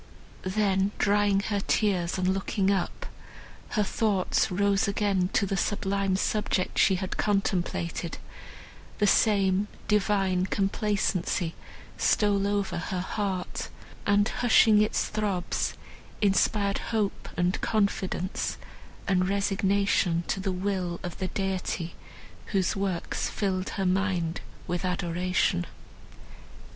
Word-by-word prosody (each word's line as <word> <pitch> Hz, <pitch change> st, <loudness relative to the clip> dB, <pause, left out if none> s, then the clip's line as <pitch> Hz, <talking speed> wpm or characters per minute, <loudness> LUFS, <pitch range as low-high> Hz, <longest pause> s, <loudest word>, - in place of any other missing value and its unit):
Then 195 Hz, -2 st, +2 dB
drying 205 Hz, -1 st, +3 dB
her 205 Hz, 0 st, -1 dB
tears 190 Hz, -4 st, +1 dB
and 185 Hz, 0 st, 0 dB
looking 195 Hz, +1 st, +1 dB
up, 190 Hz, -3 st, -2 dB, 0.7 s
her 210 Hz, -, +4 dB
thoughts 200 Hz, -2 st, +1 dB
rose 200 Hz, +1 st, +2 dB
again 200 Hz, -3 st, +1 dB
to 200 Hz, -, +3 dB
the 195 Hz, -, -1 dB
sublime 195 Hz, -1 st, 0 dB
subject 200 Hz, -1 st, 0 dB
she 190 Hz, -, +5 dB
had 185 Hz, 0 st, -4 dB
contemplated; 180 Hz, -4 st, -1 dB, 0.8 s
the 210 Hz, -, +2 dB
same 200 Hz, -1 st, +3 dB, 0.2 s
divine 195 Hz, -3 st, +2 dB
complacency 195 Hz, -4 st, 0 dB, 0.5 s
stole 200 Hz, -2 st, +2 dB
over 200 Hz, -3 st, -1 dB
her 180 Hz, +2 st, -3 dB
heart, 190 Hz, -1 st, -3 dB, 0.4 s
and, 205 Hz, +1 st, +4 dB
hushing 220 Hz, -3 st, +5 dB
its 215 Hz, -, +1 dB
throbs, 200 Hz, -5 st, -1 dB, 0.4 s
inspired 200 Hz, 0 st, +2 dB
hope 215 Hz, -3 st, -1 dB
and 175 Hz, +1 st, +1 dB
confidence 200 Hz, -3 st, -1 dB, 0.5 s
and 185 Hz, -1 st, +2 dB
resignation 195 Hz, -3 st, +1 dB
to -, -, 0 dB
the 190 Hz, 0 st, -1 dB
will 185 Hz, -2 st, -2 dB
of 175 Hz, -2 st, -6 dB
the 185 Hz, -, -1 dB
Deity, 185 Hz, -3 st, -2 dB, 0.5 s
whose 195 Hz, -1 st, 0 dB
works 195 Hz, -3 st, -2 dB
filled 190 Hz, -2 st, -1 dB
her 195 Hz, -, 0 dB
mind 180 Hz, -3 st, 0 dB, 0.2 s
with 175 Hz, 0 st, -2 dB
adoration. 180 Hz, -, 0 dB
195 Hz, 110 wpm, -27 LUFS, 185-205 Hz, 0.8 s, she